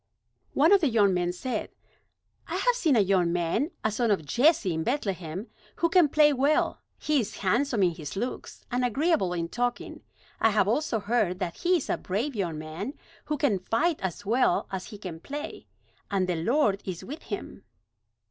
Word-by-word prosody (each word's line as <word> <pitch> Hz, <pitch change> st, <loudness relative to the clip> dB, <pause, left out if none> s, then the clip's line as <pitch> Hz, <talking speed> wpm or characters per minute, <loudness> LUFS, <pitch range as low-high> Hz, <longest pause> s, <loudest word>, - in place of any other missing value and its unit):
One 315 Hz, +6 st, +5 dB
of 400 Hz, -1 st, +6 dB
the 300 Hz, -, +3 dB
young 205 Hz, -5 st, +4 dB
men 175 Hz, -1 st, 0 dB
said: 250 Hz, +8 st, -4 dB, 0.8 s
"I -, -, -3 dB
have -, -, +3 dB
seen 335 Hz, -, +2 dB
a -, -, +5 dB
young 185 Hz, -3 st, +2 dB
man, 175 Hz, -, 0 dB
a 220 Hz, -, +1 dB
son 235 Hz, +2 st, 0 dB
of 190 Hz, -7 st, +1 dB
Jesse 240 Hz, -, +3 dB
in 160 Hz, 0 st, -2 dB
Bethlehem, 195 Hz, -, -2 dB, 0.3 s
who 335 Hz, -, +1 dB
can 345 Hz, -3 st, +5 dB
play 295 Hz, 0 st, +5 dB
well. 280 Hz, +3 st, +1 dB, 0.2 s
He 300 Hz, -2 st, +1 dB
is 225 Hz, -, -4 dB
handsome 235 Hz, +2 st, +2 dB
in 180 Hz, -, +4 dB
his 150 Hz, -3 st, -7 dB
looks, 240 Hz, +6 st, -5 dB
and 250 Hz, +1 st, 0 dB
agreeable 275 Hz, -, +1 dB
in 170 Hz, -1 st, -2 dB
talking. 245 Hz, +6 st, -3 dB, 0.4 s
I 225 Hz, -, +4 dB
have 210 Hz, -2 st, +2 dB
also 235 Hz, 0 st, +1 dB
heard 205 Hz, -3 st, 0 dB
that 170 Hz, -2 st, -4 dB
he 360 Hz, +1 st, +2 dB
is 305 Hz, -, -5 dB
a -, -, 0 dB
brave 230 Hz, +9 st, -2 dB
young 175 Hz, -6 st, -2 dB
man, 160 Hz, -, -6 dB, 0.3 s
who 300 Hz, -, -2 dB
can 250 Hz, -9 st, +1 dB
fight 295 Hz, -, 0 dB
as 190 Hz, +2 st, -4 dB
well 230 Hz, -3 st, +2 dB
as 190 Hz, -1 st, -4 dB
he 210 Hz, -, -9 dB
can 180 Hz, -5 st, -7 dB
play, 290 Hz, -, -7 dB, 0.4 s
and 195 Hz, -2 st, +1 dB
the 180 Hz, -, 0 dB
Lord 225 Hz, -, +2 dB
is 180 Hz, -3 st, -5 dB
with 300 Hz, +5 st, -7 dB
him." 205 Hz, -1 st, -7 dB
220 Hz, 190 wpm, -27 LUFS, 185-285 Hz, 0.8 s, of